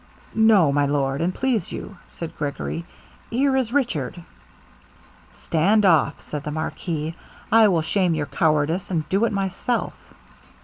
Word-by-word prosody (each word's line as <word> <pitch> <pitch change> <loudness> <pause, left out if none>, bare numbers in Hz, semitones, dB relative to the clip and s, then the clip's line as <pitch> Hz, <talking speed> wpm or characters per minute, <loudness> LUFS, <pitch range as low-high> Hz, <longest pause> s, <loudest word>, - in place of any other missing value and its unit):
'No, 215 -9 +5
my 145 0 +2
lord, 140 -1 0
an' 175 +2 +1
please 235 -3 -1
you,' 200 - -7
said 165 -1 -8
Gregory, 150 +3 -4 0.4
'here 265 +3 +2
is 255 -4 0
Richard.' 180 - -1 1.1
'Stand 200 +6 +1
off,' 165 -4 +3
said 150 -1 -6
the 150 - -4
marquis, 155 +1 -3 0.4
'I 225 -1 +7
will 170 -5 +2
shame 180 -1 +1
your 150 -2 -1
cowardice, 155 +4 0
and 160 -5 -1
do 200 +4 +2
it - - 0
myself.' 200 +4 -3
170 Hz, 140 wpm, -23 LUFS, 155-215 Hz, 1.1 s, I